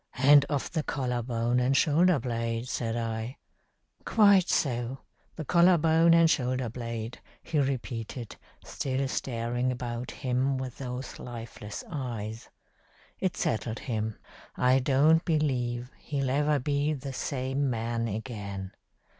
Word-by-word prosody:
'And 140 +2 +6
of 140 -2 -2
the 160 - 0
collar 125 -4 -2
bone 120 +1 0
and 130 +2 +2
shoulder 170 +2 +4
blade,' 115 -1 -2
said 115 -2 -2
I. 115 +2 -3 0.7
'Quite 200 -4 +5
so. 125 -1 0 0.3
The 155 - -5
collar 175 +3 +5
bone 165 +1 +5
and 165 0 +6
shoulder 130 -5 0
blade,' 115 -1 -5 0.2
he 155 - 0
repeated, 120 -4 -3 0.3
still 135 0 -2
staring 120 0 -1
about 120 -1 -4
him 130 +1 0
with 130 -2 -6
those 125 0 -6
lifeless 115 -3 -7
eyes. 115 -7 -5 0.7
It 185 -2 -1
settled 110 +1 -1
him. 110 -3 -3 0.4
I 125 +1 +4
don't 145 +5 +4
believe 125 -6 0
he'll 135 -3 -2
ever 145 +2 +2
be 145 +2 0
the 135 -1 -6
same 135 +1 -1
man 115 0 -1
again. 100 -3 -5
125 Hz, 130 wpm, -28 LUFS, 115-145 Hz, 0.7 s, And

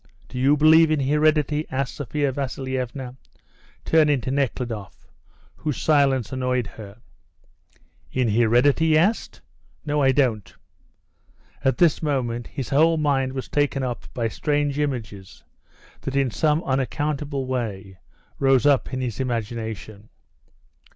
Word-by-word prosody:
Do 125 - -6
you 140 +3 +4
believe 160 +2 +6
in 155 -2 +1
heredity?" 150 +1 +1
asked 130 -2 -2
Sophia 145 +1 -2
Vasilievna, 130 -1 -4 0.7
turning 150 -3 +3
to 130 - -3
Nekhludoff, 120 -7 -3 0.5
whose 150 -3 -3
silence 135 -7 +2
annoyed 125 -2 -1
her. 100 -1 -11 1.1
"In 130 -2 0
heredity?" 120 +8 +3
he 155 -1 +4
asked. 195 +8 0 0.4
"No, 150 0 0
I 135 -1 +4
don't." 125 -7 0 1.1
At 135 - +2
this 170 -4 +3
moment 125 -6 -2
his 135 - -6
whole 160 +4 +4
mind 135 -3 0
was 130 -1 -5
taken 145 -2 0
up 125 -2 -5
by 115 -2 0
strange 145 +4 -1
images 110 -9 -4 0.6
that 135 - -4
in 135 -3 +1
some 155 +6 +1
unaccountable 140 +1 -2
way 100 -7 -4 0.4
rose 135 -2 +3
up 140 -3 +3
in 130 - -3
his 125 -3 -4
imagination. 110 -3 -4
135 Hz, 125 wpm, -23 LUFS, 120-145 Hz, 1.1 s, believe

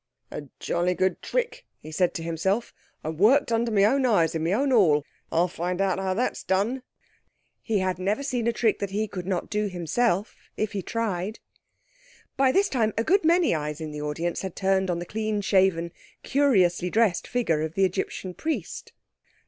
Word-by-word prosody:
"A 145 - -6
jolly 175 +1 0
good 185 0 0
trick," - - -2 0.2
he 155 - -10
said 180 +3 +1
to 165 - -4
himself, 190 +8 -1 0.3
"and 155 0 -5
worked 235 +6 +4
under 230 0 +1
my 200 -2 +4
own 265 +6 +3
eyes, 205 -10 +3
in 160 -1 -2
my 165 - 0
own 270 +7 +1
hall. 160 - +4 0.3
I'll 170 +2 +3
find 180 +1 -3
out 190 -2 +1
how 190 -1 -1
that's 245 +5 -1
done." 205 +8 0 0.8
He 220 -2 0
had 185 -2 -1
never 205 +8 -1
seen 245 -4 -1
a - - +4
trick 230 -2 +1
that 200 - -2
he 210 +3 -1
could 185 -3 -6
not 185 -3 -2
do 210 0 0
himself 185 +3 0 0.2
if 215 -1 -1
he 200 - -3
tried. 210 -1 -2 1.0
By 265 -1 +4
this 395 +8 +3
time 225 - 0
a 225 - +2
good 390 - +3
many 335 - +4
eyes 150 -1 -3
in 155 -1 -5
the 150 0 -6
audience 160 +4 -2
had 190 -3 -5
turned 190 -1 +1
on 175 - 0
the 175 - -5
clean 215 +1 -2
shaven, 190 -4 +2 0.3
curiously 190 -11 +2
dressed 215 -3 +2
figure 195 -11 0
of 160 0 -4
the 195 - +4
Egyptian 185 0 -3
Priest. 315 - -4
195 Hz, 190 wpm, -26 LUFS, 175-230 Hz, 1.0 s, worked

